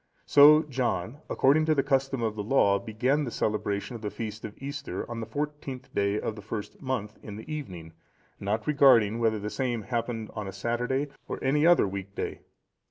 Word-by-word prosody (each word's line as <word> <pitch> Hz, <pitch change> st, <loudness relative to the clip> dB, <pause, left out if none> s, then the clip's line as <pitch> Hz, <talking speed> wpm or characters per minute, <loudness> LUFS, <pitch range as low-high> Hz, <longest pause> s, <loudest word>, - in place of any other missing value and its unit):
So 150 Hz, +2 st, +8 dB
John, 125 Hz, -, -2 dB
according 155 Hz, +4 st, +3 dB
to 155 Hz, -, +4 dB
the 140 Hz, -, +2 dB
custom 135 Hz, -2 st, 0 dB
of 110 Hz, -1 st, -1 dB
the 105 Hz, -, -3 dB
Law, 100 Hz, -3 st, +3 dB
began 125 Hz, +8 st, 0 dB
the 130 Hz, -, -3 dB
celebration 105 Hz, 0 st, -2 dB
of 115 Hz, -, -8 dB
the 105 Hz, -, -3 dB
feast 110 Hz, 0 st, -6 dB
of 110 Hz, -1 st, -7 dB
Easter, 140 Hz, +2 st, -5 dB
on 120 Hz, -1 st, -5 dB
the 110 Hz, -, -5 dB
fourteenth 145 Hz, 0 st, -5 dB
day 100 Hz, +1 st, +1 dB
of 110 Hz, -, -3 dB
the 105 Hz, -, -9 dB
first 105 Hz, 0 st, -6 dB
month, 110 Hz, -6 st, -3 dB
in 105 Hz, -, -8 dB
the 110 Hz, -, -9 dB
evening, 90 Hz, -, -7 dB, 0.5 s
not 105 Hz, +2 st, -2 dB
regarding 125 Hz, -7 st, +5 dB
whether 110 Hz, -2 st, +2 dB
the 105 Hz, +1 st, -5 dB
same 120 Hz, -4 st, -2 dB
happened 115 Hz, -1 st, -3 dB
on 105 Hz, -2 st, -5 dB
a 95 Hz, -, -6 dB
Saturday, 125 Hz, +7 st, -1 dB, 0.2 s
or -, -, -4 dB
any 150 Hz, +4 st, +3 dB
other 175 Hz, -11 st, +5 dB
week 100 Hz, 0 st, -6 dB
day. -, -, -4 dB
115 Hz, 195 wpm, -28 LUFS, 105-135 Hz, 0.5 s, So